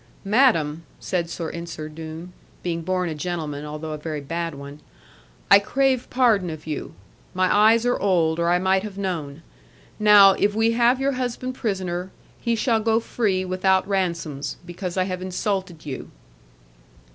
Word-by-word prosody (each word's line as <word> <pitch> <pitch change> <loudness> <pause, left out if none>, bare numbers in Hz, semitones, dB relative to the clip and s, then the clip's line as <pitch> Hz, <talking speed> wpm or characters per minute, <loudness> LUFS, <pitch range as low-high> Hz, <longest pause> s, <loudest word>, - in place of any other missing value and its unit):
'Madam,' 195 - +3 0.2
said 175 -3 -2
Sir 165 -1 -4
Ensor 170 -2 -6
Doone 160 +3 -8 0.3
being 170 -1 -2
born 180 +1 -1
a 160 - -3
gentleman, 150 -2 -4
although 150 +1 -6
a 155 - -5
very 155 0 -4
bad 165 +2 -4
one 140 +1 -10 0.7
'I 200 - +10
crave 260 +4 0
pardon 225 -8 +2
of 155 -1 -8
you. 150 - -5 0.4
My 185 +1 +2
eyes 220 +3 +5
are 245 - +1
old, 170 -4 +2
or 170 0 +1
I 175 - +4
might 190 +1 +2
have 200 -1 -8
known. 165 -6 -4 0.6
Now, 205 -2 +8
if 205 +2 +1
we 225 +1 +3
have 240 +2 +3
your 275 +1 +1
husband 255 0 -3
prisoner, 185 -6 -3 0.3
he 235 -1 0
shall 225 0 +1
go 225 +1 +2
free 200 -5 -1
without 185 +1 +1
ransoms, 170 -7 -2
because 180 +1 -6
I 185 - +3
have 185 -1 -4
insulted 185 -2 -3
you.' 135 -3 -6
185 Hz, 160 wpm, -23 LUFS, 165-210 Hz, 0.7 s, I